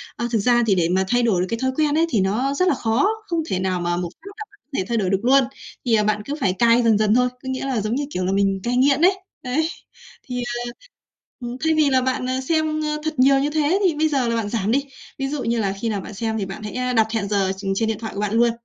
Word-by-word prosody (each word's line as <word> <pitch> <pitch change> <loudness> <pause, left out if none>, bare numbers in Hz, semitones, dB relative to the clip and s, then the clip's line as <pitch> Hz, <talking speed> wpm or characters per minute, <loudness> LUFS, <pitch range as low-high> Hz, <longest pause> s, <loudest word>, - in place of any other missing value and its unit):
Ờ, 235 - -2
thực 225 - +2
ra 240 +2 +3
thì 195 - +4
để 170 -2 +1
mà 190 +1 +2
thay 245 +2 +2
đổi 205 -7 +2
được 185 - -1
cái 230 - -2
thói 260 +1 0
quen 300 0 +1
ấy 330 - +4
thì 220 -9 +1
nó 235 +9 0
rất 365 +5 +1
là - - +4
khó, 230 - +1 0.2
không 335 -3 -1
thể 185 - -1
nào 185 -1 -1
mà 175 0 -1
một 175 -1 -3
phát - - -22
là 430 - -6
có 405 -7 -27
thể 185 - -1
thay 235 - 0
đổi 195 -4 0
được 195 0 +1
luôn. 270 +2 +5 0.4
Thì, 235 - +1
à, 210 - +3
bạn 210 0 0
cứ 285 - -4
phải 185 -2 +2
cai 235 +4 +4
dần 225 -2 +4
dần 215 0 +2
thôi, 250 0 +3
có 250 +1 -10
nghĩa 260 +1 -3
là 255 -6 -1
giống 215 +4 -1
như 285 - -1
kiểu 185 -7 -2
là 190 - 0
mình 195 0 +1
cai 245 +1 0
nghiện 275 +2 +3
ấy, 375 +2 +4 0.2
ấy. 295 +6 0 0.6
Thì, 250 - -5
ờ, 240 0 -3 0.9
ừm, 245 - -5
thay 320 0 +3
vì 305 -2 +3
là 260 -1 +3
bạn, 255 0 -1
à, 260 0 -1
xem, 310 +2 0
ơ, 300 0 -1
thật 315 -2 -3
nhiều 270 +1 +5
như 290 +2 0
thế 310 +5 +1
thì 355 -4 +3
bây 310 +1 +1
giờ 270 -5 0
là 230 - 0
bạn 225 -3 -2
giảm 215 -1 -1
đi. 275 +3 +2 0.3
Ví 270 0 -2
dụ 285 -1 -3
như 230 0 0
là 195 -2 0
khi 230 - -1
nào 205 -2 -1
bạn 205 - -9
xem 220 +2 -2
thì 195 - -2
bạn 195 +2 -8
hãy 210 - -6
a 250 0 -1
đặt 220 -2 +3
hẹn 215 -3 -1
giờ 195 -2 +1
tr 195 - -8
trên 220 +1 +1
điện 220 - -2
thoại 220 0 -6
của 200 - -4
bạn 210 -1 -1
luôn. 235 +1 +4
240 Hz, 305 wpm, -22 LUFS, 210-275 Hz, 0.9 s, luôn